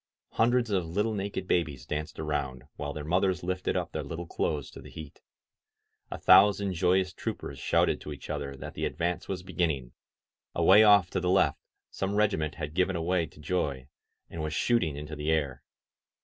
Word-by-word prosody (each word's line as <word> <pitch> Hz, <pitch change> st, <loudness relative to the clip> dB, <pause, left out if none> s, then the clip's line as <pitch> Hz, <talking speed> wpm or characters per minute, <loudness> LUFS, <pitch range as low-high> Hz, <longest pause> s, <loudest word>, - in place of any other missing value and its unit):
Hundreds 120 Hz, 0 st, +2 dB
of 90 Hz, -4 st, 0 dB
little 105 Hz, +6 st, 0 dB
naked 100 Hz, -2 st, -3 dB
babies 75 Hz, -9 st, 0 dB
danced 75 Hz, +2 st, -4 dB
around, 70 Hz, -5 st, -3 dB
while 75 Hz, 0 st, -4 dB
their 75 Hz, +1 st, -6 dB
mothers 90 Hz, +3 st, +1 dB
lifted 95 Hz, +1 st, -1 dB
up -, -, -3 dB
their -, -, -3 dB
little 85 Hz, +1 st, -6 dB
clothes 75 Hz, -3 st, -2 dB
to -, -, -11 dB
the -, -, -12 dB
heat. 80 Hz, -3 st, -10 dB, 0.9 s
A -, -, -5 dB
thousand 100 Hz, -1 st, +5 dB
joyous 90 Hz, +1 st, +2 dB
troopers 70 Hz, -3 st, -5 dB
shouted -, -, +2 dB
to 75 Hz, -, -7 dB
each 70 Hz, -, -8 dB
other 70 Hz, -2 st, -4 dB
that -, -, -8 dB
the -, -, -2 dB
advance 85 Hz, +1 st, -2 dB
was 90 Hz, -2 st, -4 dB
beginning; 80 Hz, -9 st, -1 dB, 0.6 s
away 105 Hz, +3 st, +7 dB
off 100 Hz, -4 st, +6 dB
to -, -, 0 dB
the 90 Hz, -, -1 dB
left 90 Hz, -6 st, +3 dB, 0.3 s
some 95 Hz, +1 st, -2 dB
regiment 90 Hz, -8 st, +1 dB
had 75 Hz, -1 st, -5 dB
given 95 Hz, +2 st, +1 dB
away 85 Hz, 0 st, 0 dB
to -, -, -19 dB
joy, 75 Hz, -5 st, -2 dB, 0.4 s
and 85 Hz, -, -6 dB
was 75 Hz, 0 st, -3 dB
shooting 90 Hz, -, +1 dB
into 75 Hz, +2 st, -6 dB
the 75 Hz, +1 st, -3 dB
air. 70 Hz, -5 st, 0 dB
85 Hz, 180 wpm, -29 LUFS, 75-95 Hz, 0.9 s, away